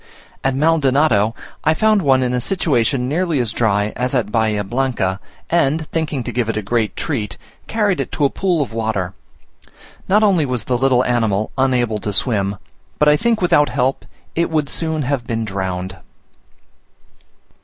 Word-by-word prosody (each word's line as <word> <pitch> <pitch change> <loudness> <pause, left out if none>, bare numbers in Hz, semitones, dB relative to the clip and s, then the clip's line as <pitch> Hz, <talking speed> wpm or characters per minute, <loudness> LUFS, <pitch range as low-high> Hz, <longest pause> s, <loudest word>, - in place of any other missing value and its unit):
At 135 -1 +1
Maldonado, 140 -7 +2 0.3
I 155 +1 +3
found 215 +2 +3
one 135 -4 +3
in 125 0 0
a 125 - 0
situation 130 -7 +1
nearly 165 +2 0
as 120 -4 0
dry 105 -2 +1
as 125 +2 -1
at 110 -5 0
Bahia 110 -2 +1
Blanca, 105 -4 -1 0.3
and 160 -1 +1
thinking 155 -5 -2
to 120 - -4
give 120 -1 -1
it 115 - -1
a 110 - -2
great 110 +1 -1
treat, 110 -11 -3 0.3
carried 205 -6 0
it 135 - -5
to 145 - +1
a 140 - +2
pool 180 -6 +1
of 120 - -9
water; 110 -5 -2 0.9
not 210 +3 +4
only 190 -6 +4
was 125 -5 -2
the 125 - -1
little 130 0 +2
animal 110 -4 0
unable 125 -5 +1
to 105 - -3
swim, 100 -2 0 0.4
but 150 - +3
I 150 - +6
think 230 +5 +1
without 150 -4 +4
help 130 +2 0 0.3
it 170 +1 0
would 155 -3 0
soon 160 -2 -2
have 130 -2 -2
been 115 -1 -2
drowned. 95 -1 -4
125 Hz, 170 wpm, -19 LUFS, 110-155 Hz, 0.9 s, I